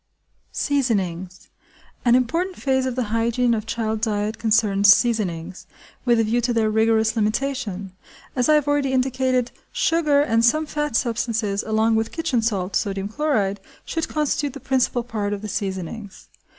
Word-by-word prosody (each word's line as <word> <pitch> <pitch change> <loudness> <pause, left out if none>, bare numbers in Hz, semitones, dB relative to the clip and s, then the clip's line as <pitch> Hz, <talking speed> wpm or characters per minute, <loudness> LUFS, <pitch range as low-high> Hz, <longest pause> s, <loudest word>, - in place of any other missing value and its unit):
Seasonings. 190 -10 -2 0.6
An 240 0 +5
important 330 +10 0
phase 265 -1 +1
of 255 - -3
the 255 - 0
hygiene 235 +1 +1
of 220 -1 -3
child 220 -1 -2
diet 215 0 -1
concerns 210 -3 +4
seasonings–with 200 +2 -1
a - - +4
view 230 +3 +1
to 240 +1 0
their 225 -2 +1
rigorous 220 0 +2
limitation. 215 -3 -2 0.4
As 250 +1 +1
I 305 - +6
have 295 -1 +1
already 290 -2 +1
indicated, 255 -1 +1 0.2
sugar 325 -11 +2
and 230 -5 +1
some 310 +7 +3
fat 295 -4 -3
substances 230 -4 0
along 220 +1 +1
with 225 0 -1
kitchen 320 -8 -1
salt 200 -4 -1
(sodium 195 -1 -1
chloride) 215 -7 0 0.3
should 325 -1 -2
constitute 300 -2 -1
the 280 - -8
principal 255 -2 0
part 210 -4 -3
of 205 0 -6
the - - -4
seasonings. 195 0 -5
230 Hz, 150 wpm, -22 LUFS, 210-265 Hz, 0.6 s, I